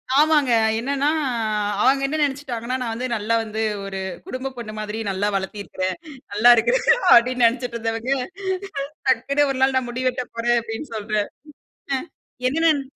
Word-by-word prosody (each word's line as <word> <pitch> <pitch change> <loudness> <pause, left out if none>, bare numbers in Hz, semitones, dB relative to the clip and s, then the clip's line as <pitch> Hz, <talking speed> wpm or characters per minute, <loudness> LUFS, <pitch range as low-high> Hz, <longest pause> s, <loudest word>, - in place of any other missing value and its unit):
ஆமாங்க. 295 -2 +4 0.3
என்னன்னா, 280 +4 0 0.7
அவுங்க 270 +3 +4
என்ன 305 +3 -2
நினச்சுட்டாங்கன்னா, 255 -4 -2
நான் 230 -2 -2
வந்து 250 +3 -3
நல்லா 220 +1 0
வந்து 220 0 -4 0.2
ஒரு 195 -1 -5 0.3
குடும்ப 260 +1 -4
பொண்ணு 220 -3 -6
மாதிரி 215 +1 -4
நல்லா 195 +1 0
வளர்த்திருக்கிறேன். 190 -1 -3 0.4
நல்லா 225 +4 +7
இருக்கிறேன் - - +2 0.3
அப்பிடின்னு 245 +1 +6
நினைச்சிட்டு 240 0 -3
இருந்தவங்க, 225 +2 -2 1.0
டக்குனு 280 +3 +2
ஒரு 260 - -5
நாள் 265 0 +3
நான் 250 -2 -4
முடி 255 +2 -3
வெட்டப் 250 -1 -4
போறேன் 240 +1 +2
அப்பிடின்னு 230 +3 -7
சொல்றேன். 210 -1 -1 0.7
அ - - +1 0.5
எகன 325 +5 +2
என்ன 285 - -2
240 Hz, 150 wpm, -22 LUFS, 225-270 Hz, 1.0 s, நல்லா